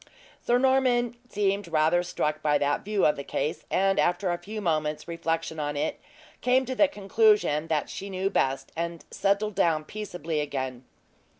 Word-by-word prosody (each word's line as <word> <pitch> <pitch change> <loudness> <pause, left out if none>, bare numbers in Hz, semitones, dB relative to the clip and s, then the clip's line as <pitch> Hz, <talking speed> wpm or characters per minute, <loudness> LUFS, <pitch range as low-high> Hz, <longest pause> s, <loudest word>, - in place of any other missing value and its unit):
Sir 240 - +2
Norman 250 -2 +2
seemed 200 -2 0
rather 165 +2 +3
struck 155 -3 -2
by 150 -1 +3
that 145 0 0
view 210 -1 +1
of 150 - +4
the 140 - -6
case, 150 - -3
and 195 0 +2
after 180 +1 +1
a 175 - -2
few 215 +2 -6
moments 155 -5 -1
reflection 165 -1 -2
on 145 -1 -2
it, 150 +2 -2 0.4
came 255 +1 +3
to 260 - -3
the 295 +3 +4
conclusion 205 - +2
that 155 -2 0
she 200 - -7
knew 190 +1 -1
best, 135 0 0
and 170 0 -4
settled 200 +2 +1
down 160 -4 +2
peaceably 175 -6 -4
again. 130 -3 -4
175 Hz, 170 wpm, -27 LUFS, 155-210 Hz, 0.4 s, of